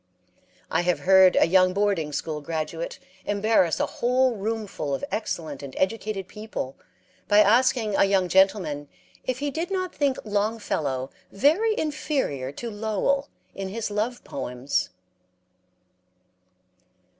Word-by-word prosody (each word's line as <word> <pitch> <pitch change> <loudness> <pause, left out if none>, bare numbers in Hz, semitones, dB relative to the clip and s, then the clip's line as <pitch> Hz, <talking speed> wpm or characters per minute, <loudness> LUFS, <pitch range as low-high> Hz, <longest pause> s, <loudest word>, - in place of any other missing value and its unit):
I 165 - +2
have 175 0 0
heard 190 -1 +6
a - - +6
young 185 +1 +4
boarding 195 -6 0
school 150 +1 -3
graduate 160 +2 -4 0.3
embarrass 205 -4 +2
a - - +2
whole 250 0 +1
room 220 +2 -2
full 145 -7 -3
of - - -4
excellent 165 -9 -3
and 140 -2 -8
educated 200 -1 -1
people 210 -10 -6 0.5
by 205 - +4
asking 225 0 +3
a - - +5
young 195 -2 +2
gentleman 185 -6 +2 0.4
if 255 -1 -1
he 285 +1 -2
did 330 +6 -3
not 370 -2 -2
think 280 -3 +1
Longfellow 205 - -1 0.2
very 335 - +3
inferior 275 - -2
to 230 +10 -6
Lowell 220 +7 0 0.2
in 195 -1 -5
his 215 +2 -4
love 220 +4 -2
poems. 130 0 -2
205 Hz, 130 wpm, -25 LUFS, 165-235 Hz, 0.5 s, heard